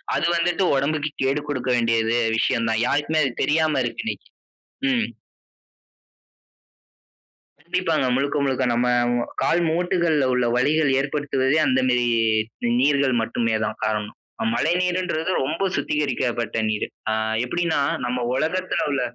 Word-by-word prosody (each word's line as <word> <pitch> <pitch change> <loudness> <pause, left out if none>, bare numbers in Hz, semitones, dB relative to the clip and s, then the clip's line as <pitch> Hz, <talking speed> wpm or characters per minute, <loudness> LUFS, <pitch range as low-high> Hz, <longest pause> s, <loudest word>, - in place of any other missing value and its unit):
அது - - 0
வந்துட்டு 175 +3 +1
உடம்புக்கு 150 +2 0
கேடு 135 +2 +1
குடுக்க 130 -3 -2
வேண்டியது 115 0 +1 0.2
விஷயம் 115 0 +1
தான். 110 +1 0
யாருக்குமே 155 +3 +1
அது 135 - 0
தெரியாம 155 -1 +2
இருக்கு 120 - -4
இன்னைக்கு. - - -5 0.6
ம். 240 -4 +1 2.6
கண்டிப்பாங்க. 165 -4 0
முழுக்க 140 +3 0
முழுக்க 130 -1 0
நம்ம 120 +1 +1 0.5
கால் 175 - +2
மூட்டுகள்ல 170 -4 +1
உள்ள 125 -1 +1
வலிகள் 145 +3 +2
ஏற்படுத்துவதே, 140 0 0
அந்தமேரி 130 -2 +2 0.7
நீர்கள் 140 -1 +3
மட்டுமே 115 0 -1
தான் - - -5
காரணம். 105 -1 -2 0.4
மழைநீர்ன்றது 180 -1 0
ரொம்ப 155 +7 -3
சுத்திகரிக்கப்பட்ட 125 -6 -1
நீர். 110 -1 -1 0.2
ஆ - - +1 0.3
எப்டின்னா 165 +2 0 0.2
நம்ம 125 0 -2
உலகத்துல 180 +7 -1
உள்ள, 140 -2 0
140 Hz, 115 wpm, -23 LUFS, 125-160 Hz, 2.6 s, நீர்கள்